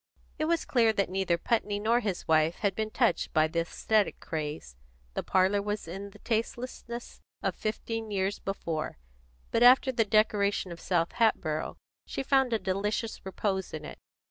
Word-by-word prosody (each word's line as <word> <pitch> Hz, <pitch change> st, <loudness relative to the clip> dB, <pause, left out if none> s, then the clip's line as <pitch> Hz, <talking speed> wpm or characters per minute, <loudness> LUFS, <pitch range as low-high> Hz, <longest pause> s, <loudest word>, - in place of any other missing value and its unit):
It 310 Hz, -, +1 dB
was 335 Hz, 0 st, +1 dB
clear 230 Hz, -3 st, +4 dB
that 200 Hz, -3 st, 0 dB
neither 190 Hz, -2 st, +1 dB
Putney 205 Hz, +1 st, 0 dB
nor 225 Hz, +3 st, +3 dB
his 205 Hz, -6 st, -3 dB
wife 160 Hz, +1 st, +3 dB
had 200 Hz, -2 st, 0 dB
been 215 Hz, +2 st, -2 dB
touched 185 Hz, -, +1 dB
by 155 Hz, 0 st, +4 dB
the 165 Hz, +1 st, -1 dB
aesthetic 210 Hz, +5 st, +1 dB
craze; 150 Hz, -, -5 dB, 0.4 s
the -, -, -1 dB
parlour 190 Hz, +2 st, +2 dB
was 205 Hz, -2 st, -3 dB
in 195 Hz, +4 st, -6 dB
the -, -, -15 dB
tastelessness 235 Hz, +1 st, -4 dB, 0.2 s
of -, -, +1 dB
fifteen 225 Hz, +1 st, -3 dB
years 195 Hz, 0 st, -1 dB
before; 165 Hz, -, -3 dB, 0.5 s
but 230 Hz, -, +1 dB
after 255 Hz, +2 st, +7 dB
the 235 Hz, -3 st, +2 dB
decoration 205 Hz, -3 st, +2 dB
of 170 Hz, -, -7 dB
South 170 Hz, -2 st, +1 dB
Hatboro', 160 Hz, -9 st, 0 dB, 0.3 s
she -, -, -3 dB
found 265 Hz, -2 st, +3 dB
a 225 Hz, -, +3 dB
delicious 210 Hz, +3 st, -2 dB
repose 190 Hz, -2 st, -2 dB
in 155 Hz, -, -7 dB
it. -, -, -9 dB
205 Hz, 170 wpm, -29 LUFS, 180-225 Hz, 0.5 s, after